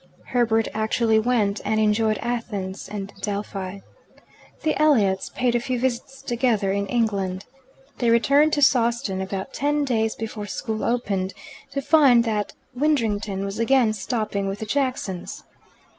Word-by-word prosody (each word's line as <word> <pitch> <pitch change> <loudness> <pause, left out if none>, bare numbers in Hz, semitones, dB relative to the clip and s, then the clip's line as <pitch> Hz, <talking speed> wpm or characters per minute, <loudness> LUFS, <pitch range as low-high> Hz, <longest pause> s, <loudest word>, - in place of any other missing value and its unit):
Herbert 225 -2 +2
actually 220 +1 +2
went, 220 -3 +1
and 220 - 0
enjoyed 215 0 +2
Athens 210 -6 -4
and 200 -1 -6
Delphi. 200 -2 -4 0.8
The 310 - +1
Elliots 210 -11 +3
paid 250 -2 0
a 240 - +2
few 250 +1 -2
visits 260 +2 -3
together 235 -5 +1
in 200 0 -1
England. 195 -5 -1 0.5
They 240 - +2
returned 280 +6 +4
to 290 - +2
Sawston 235 -7 +2
about 190 +6 -5
ten 290 +1 0
days 225 -4 0
before 215 -2 -5
school 220 +1 -4
opened, 195 -6 -1 0.3
to 275 - -3
find 280 -5 +6
that 215 -3 -2 0.2
Widdrington 220 -8 0
was 200 +2 -5
again 230 -2 +3
stopping 210 -2 -2
with 195 +1 -3
the 220 - -5
Jacksons. 255 -7 -2
220 Hz, 140 wpm, -23 LUFS, 200-250 Hz, 0.8 s, find